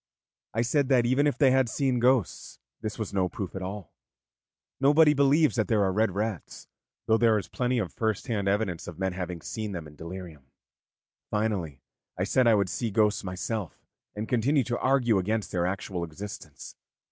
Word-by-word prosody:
I 115 - +2
said 140 +2 +1
that 125 -3 +4
even 130 +4 +3
if 145 - 0
they 135 -3 +5
had 130 -2 +3
seen 130 -1 0
ghosts, 125 -6 +1 0.2
this 110 -1 -4
was 110 -3 -4
no 95 -2 +1
proof 95 0 -6
at 95 - -5
all; 95 -1 -6 0.9
nobody 150 +3 +5
believes 140 +2 +3
that 110 - +1
there 110 -3 +2
are 95 - +1
red 110 -2 +1
rats, 105 -4 -4 0.4
though 110 0 +3
there 115 -2 +4
is 100 - -4
plenty 125 0 -1
of 100 -7 -2
first 110 -3 -1
hand 105 -6 -2
evidence 100 -4 -1
of 85 -2 -8
men 95 -1 -1
having 90 -2 -5
seen 110 -2 -4
them 85 -3 -5
in 75 0 -13
delirium. 85 -4 -9 0.8
Finally, 100 -10 -2 0.4
I 90 - 0
said 120 +6 +2
I 115 - +6
would 100 -2 +2
see 115 +3 -2
ghosts 105 0 +2
myself, 95 +1 -5 0.3
and 105 +1 -4
continue 130 +3 +2
to 120 0 -2
argue 125 -6 +3
against 110 +3 -2
their 90 -1 0
actual 95 -1 -3
existence. 95 +5 -9
110 Hz, 185 wpm, -27 LUFS, 95-125 Hz, 0.9 s, I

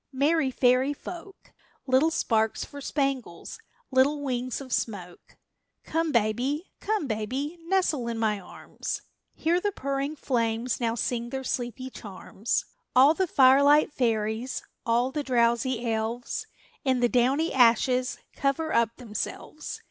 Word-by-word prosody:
Merry 285 +2 +2
fairy 255 +2 +3
folk! 360 +5 -10 0.3
Little 265 +4 +4
sparks 220 -8 0
for 285 -1 -10
spangles, 270 - -3 0.3
little 280 +3 +3
wings 255 -2 -2
of 265 -3 -6
smoke! 180 -6 -4 0.5
Come 325 0 -1
baby, 245 - 0
come 425 -6 -1
baby, 260 +8 -3
nestle 340 -9 +1
in 230 -1 -2
my 215 -2 +1
arms; 180 - -6 0.3
Hear 340 +3 +1
the 410 - 0
purring 275 -2 -2
flames 235 -3 -1
now 230 -2 0
sing 240 0 -2
their 265 +1 -4
sleepy 250 +1 -3
charms. 205 +1 -3 0.3
All 270 +4 +7
the 375 +2 0
firelight 280 +1 +5
fairies, 225 0 -1 0.2
all 240 +3 +2
the 295 - -2
drowsy 240 -1 +1
elves, 225 +2 -3 0.4
In 260 -3 +2
the 240 - +5
downy 260 +7 +2
ashes 250 +1 +3 0.2
cover 280 +3 -1
up 230 -1 +2
themselves. 245 +6 -6
255 Hz, 130 wpm, -27 LUFS, 235-285 Hz, 0.5 s, All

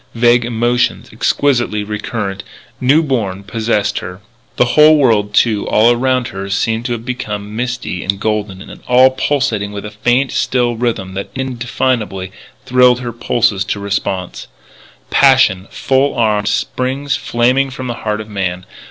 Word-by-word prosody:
Vague 120 +1 +4
emotions, 120 +1 0
exquisitely 120 -7 0
recurrent, 105 -1 -4 0.4
new 140 +6 +3
born, 105 -9 -2
possessed 110 0 -1
her. 90 +1 -8 0.4
The 125 0 +1
whole 155 +2 +7
world, 110 -7 +2
too, 110 -3 +2
all 115 +3 +4
around 130 0 0
her 95 +1 -6
seemed 110 +3 -1
to 120 - -1
have 115 0 -6
become 105 -5 -5
misty 125 -6 -3
and 100 +1 -1
golden 105 -3 -2
and - - -12
all 130 +1 +6
pulsating 130 -7 -1
with 100 0 -7
a 105 - -7
faint, 120 +5 +1
still 120 -2 0
rhythm 110 -5 -2
that 100 +1 -5
indefinably 120 -6 -2 0.3
thrilled 125 0 +4
her 120 -2 -5
pulses 115 -4 +1
to 100 +2 -3
response. 100 -2 -3 0.6
Passion, 130 -9 +4
full 135 +1 0
armed, 105 -3 +1
springs 130 +5 -1
flaming 125 +3 +1
from 130 0 -7
the 120 - -3
heart 105 -1 -2
of 105 - -9
man. 95 -3 -3
115 Hz, 150 wpm, -16 LUFS, 100-125 Hz, 0.6 s, whole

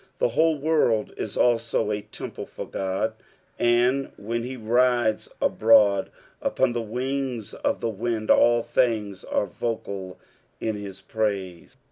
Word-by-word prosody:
The - - +2
whole 160 +6 +2
world 140 -8 +1
is - - -5
also 115 -2 +2
a 105 0 -1
temple 105 - -8
for - - -7
God, 95 +3 -2 0.5
and 120 +3 +2
when 115 +3 -3
he 130 +2 -5
rides 120 -1 +2
abroad 105 -3 +4 0.3
upon 120 - +1
the 120 - -1
wings 125 0 -3
of - - -1
the - - 0
wind, 110 +1 -1
all 120 -1 +5
things 105 -7 0
are - - 0
vocal 100 -2 -4 0.4
in 110 -1 -1
his 100 -2 -8
praise. 100 -5 -3
115 Hz, 135 wpm, -25 LUFS, 105-120 Hz, 0.5 s, all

